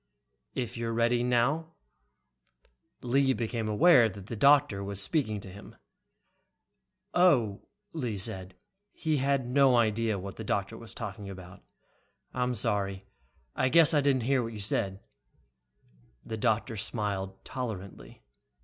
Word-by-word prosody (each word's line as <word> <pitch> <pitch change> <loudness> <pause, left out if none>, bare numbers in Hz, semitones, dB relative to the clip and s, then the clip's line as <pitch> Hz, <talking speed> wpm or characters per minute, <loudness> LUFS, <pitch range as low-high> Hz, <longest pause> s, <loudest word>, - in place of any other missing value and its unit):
"... - - -50
If 120 -2 -4
you're 115 0 -2
ready 120 +1 +2
now." 130 +7 +1 1.3
Lee 135 +2 +2
became 115 -1 -3
aware 125 0 +6
the 100 +3 -8
doctor 140 -4 +4
was 100 0 -4
speaking 110 +1 0
to 100 - -11
him. 100 +2 -12 1.4
"Oh," 125 - +3 0.3
Lee 125 -10 -3
said. 95 -1 -4 0.4
He 155 -2 -1
had 135 -1 +1
no 135 0 +4
idea 110 -1 +1
what 95 0 -7
the 110 - -6
doctor 100 +1 -2
was 115 0 -10
talking 100 -3 -6
about. 95 0 -11 0.7
"I'm 125 0 -1
sorry, 100 -3 -1 0.5
I 130 - +1
guess 165 +2 +6
I 145 - +4
didn't 135 -3 +2
hear 135 +1 +2
what 115 -1 -5
you 105 - -7
said 100 -1 -1 0.6
" - - -35
The 110 - -4
doctor 110 +1 0
smiled 100 -3 -3
tolerantly. 110 -7 -7
115 Hz, 135 wpm, -29 LUFS, 100-130 Hz, 1.4 s, aware